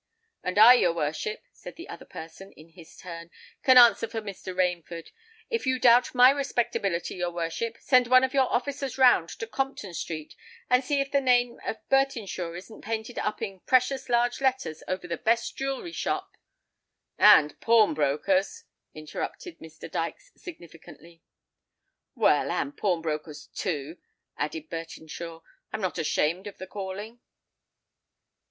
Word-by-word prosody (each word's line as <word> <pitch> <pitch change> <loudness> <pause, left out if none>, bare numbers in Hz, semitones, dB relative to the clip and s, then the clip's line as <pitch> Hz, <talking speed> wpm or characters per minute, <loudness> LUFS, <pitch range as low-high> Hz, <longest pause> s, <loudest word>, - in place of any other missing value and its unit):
"And 185 +2 -3
I, 225 +4 +10
your 175 -9 +2
worship," 170 - -3
said - - -11
the 340 +3 -10
other 420 - -10
person, 165 +5 -11
in 155 +2 -17
his 165 -1 -16
turn, 170 -2 -9 0.3
"can 260 -1 +6
answer 235 -2 +7
for 225 0 -4
Mr. 200 -3 -7
Rainford. 175 -2 -2 0.4
If 460 - -2
you 260 0 +2
doubt 245 +1 +4
my 250 +1 +8
respectability, 235 -10 -1
your 175 -1 -1
worship, 175 +7 -4
send 250 -2 +3
one 255 +1 +6
of 260 +1 0
your 265 -2 +2
officers 270 +1 -2
round 245 -11 +5
to - - -4
Compton 225 -4 -4
Street, 155 -2 -6 0.4
and 250 +1 +4
see 280 +2 0
if 275 0 -4
the 280 - +2
name 245 -2 +2
of 220 - -2
Bertinshaw 230 -11 0
isn't 205 +5 -12
painted 225 +2 -4
up 210 +1 -3
in 195 -3 -5
precious 260 +4 +1
large 240 +1 +1
letters 260 - -1
over 185 -1 -4
the 170 -1 -3
best 230 +4 0
jeweller's 275 +5 -4
shop——" - - -3 0.8
"And 150 -8 +6
pawnbroker's," 230 - +2 0.3
interrupted 155 - -7
Mr. 160 0 -11
Dykes - - -5
significantly. 170 - -13 0.9
"Well—and 285 - +1
pawnbroker's, 160 -5 -3
too," 160 -1 -4 0.4
added 155 +1 -4
Bertinshaw: 165 0 -8 0.3
"I'm 215 - -4
not 180 -3 -2
ashamed 165 +4 0
of 205 - -9
the 185 - -7
calling." 205 +4 -7
210 Hz, 145 wpm, -27 LUFS, 170-255 Hz, 0.9 s, I